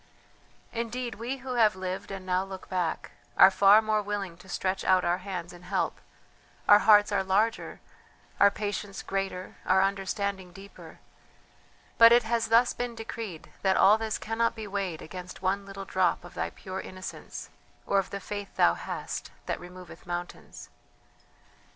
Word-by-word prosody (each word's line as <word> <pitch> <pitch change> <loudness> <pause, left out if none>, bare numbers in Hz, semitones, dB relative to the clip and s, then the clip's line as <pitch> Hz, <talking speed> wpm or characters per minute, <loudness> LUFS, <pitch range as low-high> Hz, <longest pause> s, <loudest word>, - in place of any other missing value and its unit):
Indeed, 235 +1 -3
we 240 +6 -4
who 255 - -3
have 220 -5 +4
lived 185 0 -5
and 195 -1 -7
now 185 0 +1
look 190 -1 -9
back, 180 -3 -2 0.3
are 190 - +9
far 200 +3 +6
more 215 -1 +1
willing 200 -4 -4
to 190 +2 -16
stretch 190 +1 -2
out 185 -1 +3
our 175 +1 +1
hands 180 -3 -6
in 175 - -13
help; 185 +2 -2 0.7
our 205 - +8
hearts 210 -1 +6
are - - +1
larger, 205 +4 0 0.6
our 200 - +7
patience 205 -1 -4
greater, 195 -1 -4
our 190 +1 +4
understanding 195 -1 -2
deeper; 195 +1 -13 1.0
but 230 0 +10
it 240 0 +6
has 230 +1 0
thus 230 +2 +4
been 245 -1 -4
decreed 225 -6 -7
that 190 -1 +2
all 210 +3 +6
this 220 -1 -2
cannot 230 +1 -1
be 220 -2 -6
weighed 195 -5 -3
against 180 +1 -9
one 195 +1 0
little 195 0 -7
drop 185 -2 +1
of 175 - -12
thy - - -2
pure 190 0 -7
innocence 185 0 -8 0.3
or 200 - +2
of 195 - -3
the 200 - -5
faith 205 0 -7
thou 85 - +5
hast, - - -5 0.2
that - - -3
removeth 180 -2 -12
mountains." 175 0 -7
195 Hz, 165 wpm, -28 LUFS, 185-215 Hz, 1.0 s, but